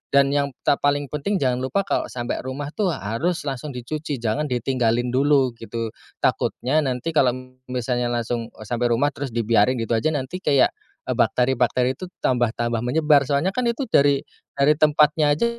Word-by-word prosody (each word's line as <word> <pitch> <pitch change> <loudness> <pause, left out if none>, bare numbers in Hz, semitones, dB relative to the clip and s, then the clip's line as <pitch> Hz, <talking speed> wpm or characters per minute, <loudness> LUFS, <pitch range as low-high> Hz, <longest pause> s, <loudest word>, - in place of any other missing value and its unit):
dan 140 0 +5
yang 140 0 +1 0.2
ta 140 - +2
paling 145 -1 0
penting 150 +8 -1
jangan 125 -1 +1
lupa 130 +10 0
kalo - - -1
sampe 120 -1 -4
rumah 140 +3 -5
tuh 190 -2 0
harus 140 - -2
langsung 140 0 -5
dicuci 145 +4 -4
jangan 120 +5 -1
ditinggalin 120 -1 0
dulu 135 0 +3
gitu, 115 -1 -4 0.3
takutnya 140 +6 +1
nanti 130 +2 -2
kalo 130 -5 +3 0.3
misalnya 125 -1 -1
langsung 120 -1 -2
eee, - - -10
sampe 120 +2 -1
rumah 125 +5 +2
terus 135 -5 -6
dibiarin 115 +1 +3
gitu 115 -2 -4
aja - - 0
nanti 145 +6 -4
kayak 140 -7 +3 0.3
eee, - - -2
bakteri-bakteri 125 0 +1
itu 185 - -6 0.2
tambah 125 -2 +2
tambah 120 -1 -1
menyebar 145 +2 +3
soalnya 145 +6 +1
kan 245 +3 -1
itu 235 +4 -1
dari 140 -1 +4 0.3
dari 140 +2 +4
tempatnya 150 0 +4
aja 195 - +1
130 Hz, 175 wpm, -23 LUFS, 120-150 Hz, 0.3 s, dan